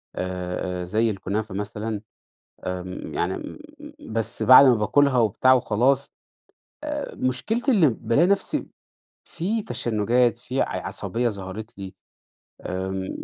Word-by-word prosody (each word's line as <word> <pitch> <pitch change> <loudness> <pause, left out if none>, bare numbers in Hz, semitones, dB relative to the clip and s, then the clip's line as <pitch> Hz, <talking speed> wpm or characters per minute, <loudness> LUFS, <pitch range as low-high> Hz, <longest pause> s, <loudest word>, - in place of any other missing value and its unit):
آآ، 90 0 -3
آآ، - - -3
زي 110 +6 +1
الكنافة 100 +1 -3
مثلًا، 105 +1 -4 0.6
آمم 90 0 -5
يعني - - -1
م - - -8 0.6
بس 115 -1 -2
بعد 130 +2 +9
ما 125 - +6
باكُلها 130 +5 +3
وبتاع 115 +4 +4
وخلاص، 130 +3 +1 0.7
آآ 300 -1 -4
مشكلتي 220 - 0
إنّي 185 -10 +5
بالاقي 135 +6 +2
نفْسي، 200 +1 0 0.6
في 210 +7 -2
تشنُّجات 120 - +1
في 130 +2 -2
ع - - -2
عصبية 120 +1 -2
ظهرت 105 +3 -7
لي، 95 -1 -7 0.7
آمم. 95 +1 -4
115 Hz, 120 wpm, -24 LUFS, 95-130 Hz, 0.7 s, بعد